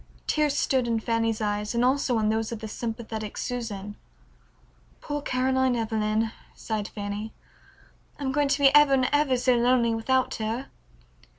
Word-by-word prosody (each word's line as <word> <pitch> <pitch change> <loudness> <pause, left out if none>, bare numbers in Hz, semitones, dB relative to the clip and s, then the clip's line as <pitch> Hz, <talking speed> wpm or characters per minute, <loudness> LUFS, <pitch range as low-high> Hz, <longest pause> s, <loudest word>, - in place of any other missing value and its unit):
Tears 300 -2 +1
stood 260 -3 +1
in 230 -1 +1
Fanny's 225 -1 0
eyes 210 +1 -2
and 235 +1 +3
also 260 -2 +2
in 215 -1 +1
those 220 +1 -1
of 230 - -3
the 220 0 -7
sympathetic 220 -1 -5
Susan. 210 -5 -4 1.0
"Poor 290 -1 -4
Caroline 260 -1 +1
Evelyn," 220 -1 0 0.2
sighed 215 -2 -3
Fanny, 205 +1 -5 0.9
"I'm 270 -2 -2
going 290 +1 +1
to 275 +1 +1
be 275 -1 +5
ever 295 -2 +6
and 260 -1 +2
ever 290 -3 +3
so 250 +1 +3
lonely 240 -1 +3
without 255 +3 +1
her." 225 +4 -3
235 Hz, 155 wpm, -26 LUFS, 220-260 Hz, 1.0 s, ever